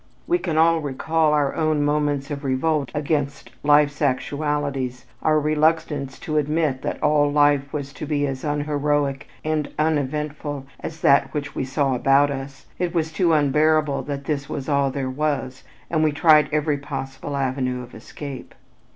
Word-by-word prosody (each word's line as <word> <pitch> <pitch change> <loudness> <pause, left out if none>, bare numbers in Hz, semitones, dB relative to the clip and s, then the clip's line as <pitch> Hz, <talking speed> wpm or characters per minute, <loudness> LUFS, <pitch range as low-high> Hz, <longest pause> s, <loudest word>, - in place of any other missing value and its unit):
We 350 +1 +1
can 165 - -2
all 165 +1 +4
recall 155 +2 0
our 145 -2 +2
own 155 -2 +1
moments 145 -1 0
of 145 0 -4
revolt 140 +1 0
against 145 -1 -2
life's 145 0 +3
actualities, 140 -2 -1 0.2
our 155 -1 +3
reluctance 150 -2 0
to 155 -1 -2
admit 150 -2 0
that - - -3
all 150 -1 +3
life 145 -1 +3
was 140 -2 -5
to 155 - -7
be 145 -1 0
as 135 -2 -4
unheroic 145 -2 -1 0.2
and 155 -2 -1
uneventful 150 -1 -1
as 160 0 -7
that 140 0 +4
which 145 -1 -3
we - - -2
saw 135 0 0
about 135 +3 +3
us, 135 0 -7
it 175 -1 -1
was 160 -1 0
too 170 0 +2
unbearable 150 0 +2
that 140 -1 -5
"this 140 -2 -2
was 135 - -4
all 140 -2 +2
there 135 0 -3
was" 135 -1 -2 0.2
and 160 -2 +1
we 155 - +3
tried 155 0 +5
every 150 -1 0
possible 140 0 -5
avenue 130 -2 -1
of 120 - -13
escape. 135 +4 -9
145 Hz, 160 wpm, -23 LUFS, 140-155 Hz, 0.2 s, tried